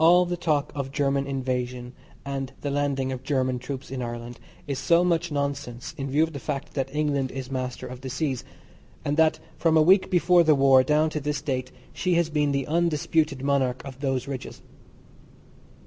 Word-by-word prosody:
All 175 +2 +7
the 175 0 -2
talk 155 -4 0
of 140 -2 -4
German 140 0 0
invasion 125 -2 -3 0.3
and 135 -1 -3
the 145 - -2
landing 140 -2 0
of 130 -1 -4
German 130 -2 0
troops 130 +1 -6
in 130 -1 -3
Ireland 120 0 -6 0.3
is 140 -3 -3
so 170 +1 +4
much 170 -2 +1
nonsense 140 -4 -3
in 135 0 -4
view 145 +4 +3
of 160 0 -2
the 140 - -5
fact 140 +1 -4
that 135 -2 -1
England 145 -2 0
is 130 0 -6
master 130 -1 -3
of 125 0 -8
the 130 - -5
seas, 130 -2 -2 0.6
and 145 - 0
that 160 -1 +4 0.2
from 160 -1 +4
a - - +6
week 185 +4 +5
before 175 -1 +5
the 155 -2 +5
war 135 -1 +6
down 150 +4 +2
to 155 - -2
this 145 0 -3
date 130 -3 -2 0.2
she 180 -2 0
has 170 -2 +1
been 150 -1 +1
the 140 -1 0
undisputed 155 -3 +1
monarch 135 -3 +1
of 135 -1 -9
those 135 -2 -1
ridges. 135 -2 -6
140 Hz, 195 wpm, -26 LUFS, 130-155 Hz, 0.6 s, All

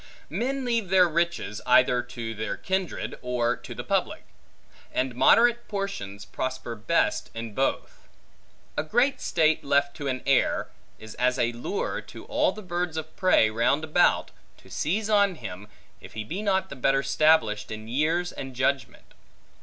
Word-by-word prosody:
Men 265 +2 -2
leave 230 -5 0
their 185 -1 +6
riches, 170 -9 -1
either 125 0 +5
to 120 -2 -6
their 110 -2 -4
kindred, 190 -2 -3
or 125 -1 0
to - - -10
the - - -5
public; - - -1 0.7
and 130 -1 -1
moderate 235 - +4
portions, 195 - -5
prosper 130 -2 -4
best 110 +1 0
in 115 -1 -6
both. 135 +5 -2 0.7
A - - +1
great 245 - +1
state 160 -2 +2
left 140 0 +1
to 145 - -4
an 130 -1 -2
heir, 135 -2 +2 0.3
is 110 0 -10
as 125 +1 +2
a 120 - +1
lure 410 - -3
to - - -12
all - - +1
the 215 - -10
birds 175 -2 -2
of 160 0 -6
prey 185 -12 +4
round 120 +7 +1
about, 155 -1 +2 0.3
to - - -18
seize 200 +8 -1
on 200 -3 +3
him, 100 - -8 0.3
if - - -13
he 110 - -4
be 175 - -5
not 195 -2 0
the - - -7
better 135 +1 +2
stablished 115 -12 +3
in 110 0 -7
years 160 +8 0
and 135 -1 -7
judgment. 130 -2 -2
140 Hz, 160 wpm, -26 LUFS, 120-185 Hz, 0.7 s, their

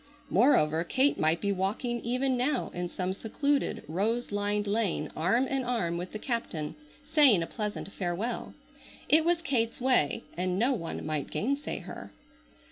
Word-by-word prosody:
Moreover 165 - +4
Kate 265 +11 +2
might 160 +2 +2
be 200 - +1
walking 205 +6 -1
even 255 +2 0
now 255 +2 0
in 175 0 -3
some 185 +1 -2
secluded, 280 +8 -1
rose 215 +10 -1
lined 205 0 0
lane 200 -7 0
arm 230 +11 +2
in 270 0 -1
arm 230 -9 -1
with 180 +1 -5
the - - -4
captain, 210 - -3 0.3
saying 290 - +5
a - - -2
pleasant 210 0 -4
farewell. 190 +6 -3 0.5
It 315 +1 +6
was 340 0 +1
Kate's 230 -6 0
way 250 - +2
and 180 +1 -1
no 245 +6 +3
one 165 -9 -4
might 155 -2 -2
gainsay 280 +6 -2
her. - - -9
215 Hz, 155 wpm, -29 LUFS, 180-255 Hz, 0.5 s, It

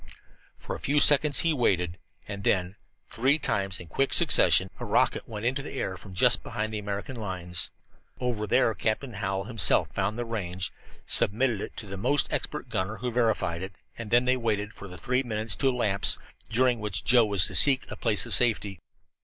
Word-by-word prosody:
For - - -7
a - - -9
few 145 +2 0
seconds 145 -1 +5
he 165 -1 +1
waited, 90 - 0 0.3
and 100 -1 -7
then, 95 0 0 0.3
three 135 +6 +1
times 100 -10 -2
in 90 - -9
quick 135 - -1
succession, 95 - +4
a - - -6
rocket - - 0
went 110 0 -7
into 135 +3 -1
the 135 - -9
air 95 -8 -4
from 95 0 -12
just 125 +4 +4
behind 110 +1 -5
the 105 - -3
American 100 +5 -6
lines. 90 -5 -1 0.5
Over 120 -4 -3
there 110 - +2
Captain 115 +4 -3
Hallowell 95 -2 -3
himself 115 -2 +2
found 100 +3 -2
the 120 - -4
range, 95 -5 -4 0.3
submitted 110 0 +2
it - - -8
to 110 - -5
his 100 0 -7
most 140 +7 +1
expert - - -4
gunner, 95 +4 -4
who 125 +3 -4
verified 110 -8 -1
it, 95 +1 -7 0.2
and 115 -3 -8
then 120 +2 +3
they 130 0 +1
waited 105 -3 -3
for 100 - -11
the 90 -1 -11
three 125 +9 -1
minutes 110 -3 +2
to 135 - +1
elapse, 105 -6 +2 0.3
during 125 +1 +1
which 105 -3 -4
Joe 120 0 +4
was 100 -3 +5
to - - -5
seek 135 -2 +7
a - - -5
place 110 -3 +2
of - - -4
safety. 105 -6 +1
110 Hz, 195 wpm, -26 LUFS, 95-125 Hz, 0.5 s, seek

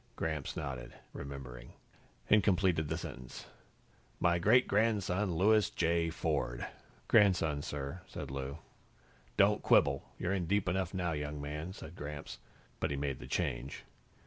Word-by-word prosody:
Gramps 80 -4 -3
nodded, 65 -5 -5 0.2
remembering, 65 -3 -8 0.5
and 105 -2 +5
completed 90 -5 +2
the - - -1
sentence 65 0 -8 0.7
"my 85 0 +3
great 125 +8 +5
grandson, 100 -3 +1
Louis 105 +1 +4
J. 85 0 +1
Ford." - - -1 0.4
"Grandson, 90 -9 +4
sir," 70 +4 -5
said - - -6
Lou. 70 +1 -4 0.8
"Don't - - +5
quibble. 70 -1 +3
You're 95 +1 -1
in 90 -4 -1
deep 100 +1 +1
enough 95 0 0
now, 90 -2 0
young 75 -1 -3
man," 75 +4 -4
said 80 -2 -10
Gramps, 75 -5 -7 0.4
but - - 0
he 70 - -2
made 70 -2 -2
the - - -9
change. 60 +3 -2
80 Hz, 140 wpm, -33 LUFS, 70-95 Hz, 0.8 s, and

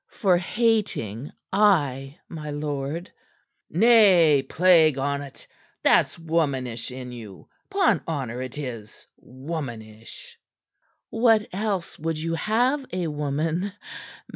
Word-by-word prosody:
"For 190 -5 +2
hating 180 - -1 0.2
ay, 145 -9 +2
my 155 -2 -7
lord." 145 +2 -4 0.6
"Nay, 185 - +5
plague 165 -5 +4
on't! 140 0 -4 0.4
That's - - +3
womanish 140 -8 -2
in 125 -1 -8
you. 110 -6 -11 0.2
'Pon 395 -1 +2
honor 130 -6 -3
it 130 +2 -7
is! 115 -7 -7
Womanish!" 130 - -8 0.7
"What 225 -2 +3
else 195 -3 -3
would 160 0 -2
you 165 +2 -3
have 245 - +1
a 180 -1 -2
woman? 155 +6 -2
155 Hz, 100 wpm, -24 LUFS, 135-190 Hz, 0.7 s, Nay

